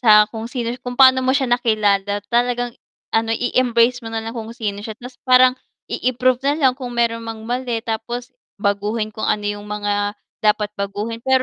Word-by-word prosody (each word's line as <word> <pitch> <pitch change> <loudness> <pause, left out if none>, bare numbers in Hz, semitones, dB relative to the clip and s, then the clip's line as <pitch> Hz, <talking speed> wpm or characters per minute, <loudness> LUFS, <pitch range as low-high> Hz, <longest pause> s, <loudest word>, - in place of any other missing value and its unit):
sa 210 -3 +7
kung 225 0 -5
sino 240 -2 -3
kung 245 0 -5
paano 260 -1 +7
mo 260 0 +2
siya 275 - +1
nakilala 205 -4 +1
talagang 245 0 +1 0.4
ano 225 0 +2
i-embrace 245 0 +2
mo 230 - -7
nalang 225 0 -4
kung 220 -1 -6
sino 205 -3 -3
siya 215 +1 -6
tapos 250 0 -11
parang 255 0 +7 0.4
i-improve 255 0 +1
na 285 - +3
lang 270 -5 +4
kung 245 -2 -6
meron 230 -1 +1
mang 225 -1 -6
mali 245 0 -2
tapos 240 +2 -4 0.3
baguhin 210 +2 -1
kung 215 - -3
ano 210 -1 0
yung 205 0 -3
mga 205 0 -1 0.3
dapat 210 -1 +2
baguhin, 205 +3 -3
pero 260 -1 +3
230 Hz, 180 wpm, -20 LUFS, 210-245 Hz, 0.4 s, sa